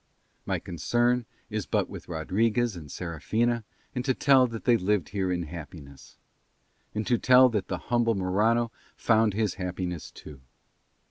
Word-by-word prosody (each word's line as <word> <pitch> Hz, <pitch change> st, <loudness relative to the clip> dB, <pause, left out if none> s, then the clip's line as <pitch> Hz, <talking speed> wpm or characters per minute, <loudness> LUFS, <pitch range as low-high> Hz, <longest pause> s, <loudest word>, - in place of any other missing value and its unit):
My -, -, 0 dB
concern 120 Hz, +7 st, 0 dB, 0.2 s
is -, -, -3 dB
but -, -, +1 dB
with -, -, -10 dB
Rodriguez 105 Hz, +7 st, 0 dB
and 75 Hz, -5 st, -9 dB
Serafina 110 Hz, +8 st, -1 dB, 0.3 s
and 125 Hz, -, -2 dB
to 130 Hz, -1 st, +1 dB
tell 135 Hz, -2 st, +5 dB
that 115 Hz, -2 st, -7 dB
they 120 Hz, -, +5 dB
lived 105 Hz, -3 st, 0 dB
here 95 Hz, -1 st, -1 dB
in 90 Hz, -1 st, -1 dB
happiness; 75 Hz, -3 st, -10 dB, 0.8 s
and 110 Hz, 0 st, -1 dB
to 120 Hz, -2 st, +2 dB
tell 130 Hz, 0 st, +6 dB
that 105 Hz, -5 st, -2 dB
the 90 Hz, -, -2 dB
humble 115 Hz, +2 st, +1 dB
Morano 110 Hz, +5 st, +1 dB, 0.3 s
found 110 Hz, -3 st, +3 dB
his 105 Hz, -3 st, 0 dB
happiness 90 Hz, -2 st, -4 dB
too. 70 Hz, -3 st, -12 dB
105 Hz, 150 wpm, -27 LUFS, 90-120 Hz, 0.8 s, tell